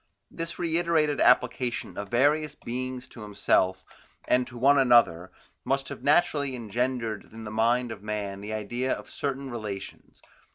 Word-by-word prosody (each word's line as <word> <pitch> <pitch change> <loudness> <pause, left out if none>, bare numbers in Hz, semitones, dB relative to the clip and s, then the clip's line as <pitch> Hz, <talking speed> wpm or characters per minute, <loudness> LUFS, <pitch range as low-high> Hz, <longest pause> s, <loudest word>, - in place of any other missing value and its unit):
This 165 0 -5
reiterated 165 -3 +1
application 125 -2 +2
of 100 -1 -5
various 150 +5 +2
beings 130 +1 -5
to 115 - -12
himself, 100 -2 +1 0.4
and 125 0 +2
to 125 - -10
one 140 +3 +5
another, 115 -9 +4 0.3
must 135 0 -1
have - - -7
naturally 145 -3 +2
engendered 120 -1 -2
in 110 +1 -9
the 105 - -6
mind 120 +2 +1
of 105 -3 -8
man 100 -2 -4
the 105 +1 -6
idea 120 +5 -2
of - - -8
certain 135 -1 -3
relations. 105 -4 -7
125 Hz, 150 wpm, -27 LUFS, 105-140 Hz, 0.4 s, one